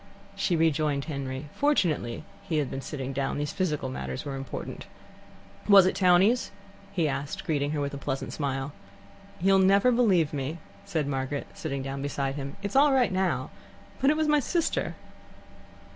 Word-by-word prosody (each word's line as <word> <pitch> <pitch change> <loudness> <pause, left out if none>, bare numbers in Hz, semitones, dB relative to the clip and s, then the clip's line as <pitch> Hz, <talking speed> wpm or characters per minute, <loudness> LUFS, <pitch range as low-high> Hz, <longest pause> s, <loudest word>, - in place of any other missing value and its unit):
She 175 - +1
rejoined 155 -3 +1
Henry. 140 -2 -4
Fortunately 170 - +1 0.2
he 180 -5 -2
had 145 -4 0
been 135 - -4
sitting 135 -1 -5
down: 135 +1 -1
these 145 0 -2
physical 150 -8 -1
matters 130 +1 -5
were 140 -1 -4
important. 135 -1 -6 0.8
"Was 195 -2 +9
it 185 - +2
townees?" 190 +6 +4 0.4
he 175 -5 +1
asked, 145 +7 -3
greeting 145 -4 0
her 150 0 -1
with 140 0 -2
a 140 - -5
pleasant 135 -1 -3
smile. 140 -1 -2 0.7
"You'll 195 +2 +4
never 195 +5 +5
believe 195 -11 +3
me," 145 +3 -3 0.3
said 160 -7 -1
Margaret, 135 0 -2
sitting 140 -4 -4
down 135 0 -4
beside 140 -1 -2
him. 140 -1 -6
"It's 200 +3 -4
all 285 +2 +6
right 255 -5 +3
now, 185 -1 0 0.5
but 270 - +4
it 305 - +3
was 315 -1 +1
my 300 0 +4
sister." 335 +4 -1
150 Hz, 165 wpm, -27 LUFS, 140-195 Hz, 0.8 s, Was